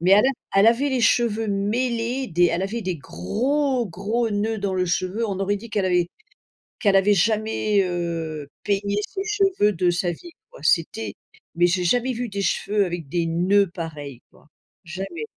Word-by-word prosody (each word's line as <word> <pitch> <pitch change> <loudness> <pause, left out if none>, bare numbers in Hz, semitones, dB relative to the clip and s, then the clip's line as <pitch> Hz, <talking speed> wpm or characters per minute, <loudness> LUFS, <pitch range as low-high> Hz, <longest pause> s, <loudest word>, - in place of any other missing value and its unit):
mais 180 +3 +4
elle 210 +5 +6
a 270 - +4 0.3
elle 215 - +6
avait 255 +5 +2
les 260 - 0
cheveux 225 -1 +2
mêlés, 235 +5 -1
des 175 +1 +3
elle 175 +2 0
avait 220 +4 -3
des 185 -2 -2
gros 250 - -1
gros 215 +6 -2
noeuds 215 +2 -1
dans 195 -1 -2
le 185 0 +1
cheveux, 185 +6 -1
on 195 -2 -3
aurait 200 +1 +1
dit 225 +2 -10
qu'elle 200 -2 0
avait 180 -1 +2 0.7
qu'elle 200 -3 +3
avait 195 +2 +5
jamais, 215 0 +1
heu, 165 -4 -3 0.2
peigné 200 0 0
ses 390 -1 -4
cheveux 390 - +2
de 180 -1 +1
sa 175 0 0
vie 345 - -10 0.2
quoi. - - -14
C'était 110 - 0 0.4
mais, 175 +1 +4
j'ai 180 0 0
jamais 245 +7 +2
vu 245 +1 -3
des 200 0 -3
cheveux 205 +1 +1
avec 175 -4 -5
des 170 +1 0
noeuds 185 +4 +2
pareils 150 -7 -7
quoi, - - -23 0.4
jamais! 175 -2 -6
200 Hz, 185 wpm, -23 LUFS, 175-230 Hz, 0.7 s, elle